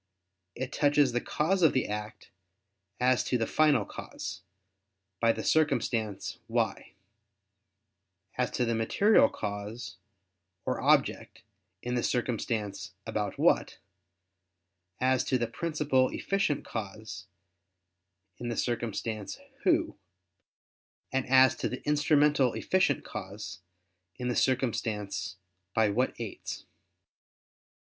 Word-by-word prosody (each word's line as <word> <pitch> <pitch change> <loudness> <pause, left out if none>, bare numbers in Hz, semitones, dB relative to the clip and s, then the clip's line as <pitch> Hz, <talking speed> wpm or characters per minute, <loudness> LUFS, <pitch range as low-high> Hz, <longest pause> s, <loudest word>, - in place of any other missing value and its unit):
It 130 +2 -4
touches 145 -2 +3
the 120 0 0
cause 185 +5 0
of 160 - +5
the 130 - +1
act, 105 0 -6 0.7
as 125 0 +3
to 125 - +1
the 115 - 0
final 145 -8 +3
cause, 95 -2 -7 0.8
by 115 0 +4
the - - -4
circumstance 120 -9 0
"why"; - - -1 1.4
as 125 0 0
to 125 - 0
the 115 - 0
material 205 - +4
cause, 105 +1 -5 0.7
or - - -1
object, - - +2 0.4
in 125 - -2
the 120 - +1
circumstance 115 -4 -2
"about - - -2
what"; - - +2 1.2
as 130 0 +3
to 130 - +2
the 120 - 0
principal 140 0 +1
efficient 195 -8 -1
cause, 110 -1 -6 1.1
in 120 - -4
the 120 - -3
circumstance 110 -3 -2 0.3
"who"; - - +2 1.1
and 135 0 0
as 130 0 +6
to - - -1
the 125 - -6
instrumental 150 -3 +3
efficient 185 -7 +1
cause, 100 0 -7 0.6
in 125 0 -2
the 120 - 0
circumstance 110 -7 -1 0.4
"by 110 -1 +4
what 125 +6 0
aids." 115 -4 -6
125 Hz, 110 wpm, -29 LUFS, 110-140 Hz, 1.4 s, as